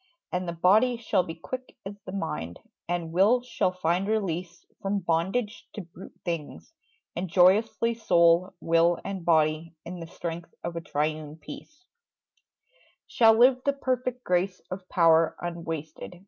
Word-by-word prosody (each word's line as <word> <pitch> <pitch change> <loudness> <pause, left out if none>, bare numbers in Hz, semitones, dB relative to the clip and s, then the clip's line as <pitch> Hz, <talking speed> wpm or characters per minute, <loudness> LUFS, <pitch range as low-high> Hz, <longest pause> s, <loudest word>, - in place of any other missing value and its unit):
And 180 0 -2
the - - -1
body 215 +9 +4
shall 215 -4 +1
be 165 -2 -7
Quick 255 +11 -8
as 195 - -5
the - - -5
mind; 85 - -4 0.3
and 170 -2 -2
will 215 +8 +4
shall 240 -6 0
find 180 +1 0
release 180 -5 -2 0.2
From 200 0 -1
bondage 190 +7 -1
to 210 - -5
brute 175 +1 -14
things; 170 - -5 0.4
and 180 +1 -3
joyously 210 +6 +4
Soul, 175 -4 +3
will 165 +1 +3
and 195 -2 -4
body, 160 0 +2
in 180 +1 -7
the 165 - -7
strength 170 0 -7
of 170 0 -4
triune 155 0 -2
peace, 295 - -12 1.2
Shall 225 -2 +5
live 250 +2 +6
the 280 - +2
perfect 255 -2 -2
grace 180 +1 0
of 185 0 -7
power 165 -2 +4
unwasted. 170 0 -6
180 Hz, 145 wpm, -27 LUFS, 165-215 Hz, 1.2 s, live